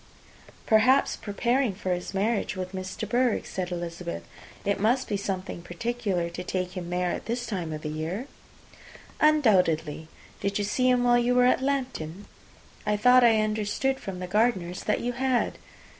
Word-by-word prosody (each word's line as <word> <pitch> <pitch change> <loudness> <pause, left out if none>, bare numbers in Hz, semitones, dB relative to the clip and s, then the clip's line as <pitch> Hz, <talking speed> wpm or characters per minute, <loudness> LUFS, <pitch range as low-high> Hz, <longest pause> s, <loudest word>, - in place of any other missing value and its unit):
"Perhaps 225 +5 +4
preparing 235 +2 0
for 185 -1 -1
his 180 0 -4
marriage 205 +2 0
with 185 0 -5
Miss 185 0 -5
de 220 - -4
Bourgh," 240 +2 +1
said 185 -1 -4
Elizabeth. 170 - -5 0.4
"It 200 0 +1
must 245 +6 +2
be 205 - -1
something 190 -2 -4
particular 195 -1 -2
to 180 - -6
take 180 0 -2
him 175 -2 -5
there 180 0 0
at - - -5
this 240 +1 -2
time 180 -8 -3
of 155 0 -6
year." 160 - -3 0.9
"Undoubtedly. 180 - +3 0.3
Did 200 0 -1
you 205 - 0
see 255 +5 +1
him 250 -1 +3
while 240 0 +5
you 245 +1 +2
were 250 0 +5
at 255 - +3
Lambton? 250 - -2 0.6
I 210 0 +1
thought 250 +4 +6
I 225 -2 +5
understood 215 +5 0
from 195 -2 -6
the 180 - -4
Gardiners 185 -3 +1
that 210 - +1
you 245 - -1
had." 255 0 0
205 Hz, 170 wpm, -27 LUFS, 180-245 Hz, 0.9 s, thought